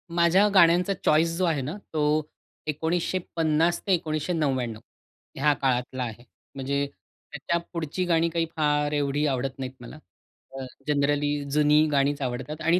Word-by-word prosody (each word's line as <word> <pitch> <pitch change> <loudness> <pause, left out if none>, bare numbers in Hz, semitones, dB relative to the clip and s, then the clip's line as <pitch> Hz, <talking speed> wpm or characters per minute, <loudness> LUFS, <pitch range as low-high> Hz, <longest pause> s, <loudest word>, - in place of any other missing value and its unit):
माझ्या 175 +4 +5
गाण्यांचा 180 +1 +5
चॉईस 165 +2 +3
जो 185 - +2
आहे 155 -5 +1
ना, 145 +7 -4 0.2
तो 150 0 +1 0.4
1950 165 0 0
ते 195 - +4
1999 150 -8 -1 0.6
ह्या 145 +2 +3
काळातला 130 -1 -1
आहे. 120 0 -7 0.3
म्हणजे 140 +1 -1 0.5
त्याच्या 150 +3 -1 0.2
पुढची 165 +2 -2
गाणी 170 -1 +2
काही 165 0 0
फार 150 -1 +1
एवढी 145 0 0
आवडत 135 0 -2
नाहीत 130 -1 -4
मला. 125 +5 -10 0.6
अ 130 - -5 0.2
जनरली 145 0 +1
जुनी 150 +1 +4
गाणीच 140 0 +1
आवडतात 130 +4 -4
आणि 170 +3 +3
150 Hz, 135 wpm, -26 LUFS, 140-165 Hz, 0.6 s, माझ्या